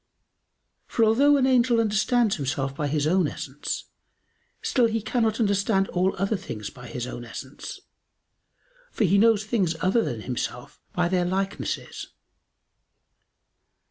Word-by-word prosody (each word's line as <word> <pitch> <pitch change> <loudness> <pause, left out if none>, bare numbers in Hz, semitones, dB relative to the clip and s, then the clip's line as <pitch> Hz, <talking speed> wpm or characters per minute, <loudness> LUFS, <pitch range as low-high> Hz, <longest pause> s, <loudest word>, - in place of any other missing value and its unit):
For 230 - +2
although 280 +7 +5
an 265 - +3
angel 245 -2 +4
understands 220 +1 +2
himself 135 -1 -2
by 145 +1 -1
his 145 0 0
own 175 +1 +3
essence, 140 0 -5 0.8
still 245 -3 +3
he 225 0 -1
cannot 225 0 0
understand 200 -2 +2
all 185 +2 +1
other 195 +3 0
things 105 - -6
by 125 -2 -11
his 120 0 -4
own 120 -1 -6
essence; 130 +4 -8 1.1
for - - 0
he 200 +1 +4
knows 220 -1 +4
things 195 -7 0
other 190 +6 +2
than 120 - -3
himself 125 0 -5
by 175 -1 +1
their 180 0 +1
likenesses. 195 +2 -3
195 Hz, 135 wpm, -25 LUFS, 145-225 Hz, 1.1 s, although